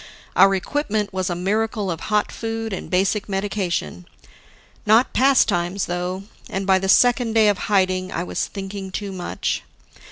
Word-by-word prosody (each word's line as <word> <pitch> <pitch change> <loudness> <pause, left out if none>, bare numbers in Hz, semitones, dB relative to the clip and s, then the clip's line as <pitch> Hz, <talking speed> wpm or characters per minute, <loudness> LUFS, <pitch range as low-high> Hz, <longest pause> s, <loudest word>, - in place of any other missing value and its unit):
Our 195 0 +6
equipment 210 -1 -2
was 185 -1 -1
a 175 - -1
miracle 210 +2 -1
of 165 - -4
hot 210 -1 +1
food 225 -1 -4
and 190 - -6
basic 195 +3 0
medication. 190 - -2 0.8
Not 220 +4 +4
pastimes, 200 -9 +2
though; 180 +2 -3 0.3
and 195 0 -3
by 190 -1 +4
the 190 0 -2
second 245 +1 +4
day 220 -1 +5
of 200 -3 0
hiding, 185 -2 +1
I 170 - -2
was - - -2
thinking 195 -1 -6
too 200 +1 -5
much. 180 -2 -3
195 Hz, 155 wpm, -22 LUFS, 185-215 Hz, 0.8 s, Our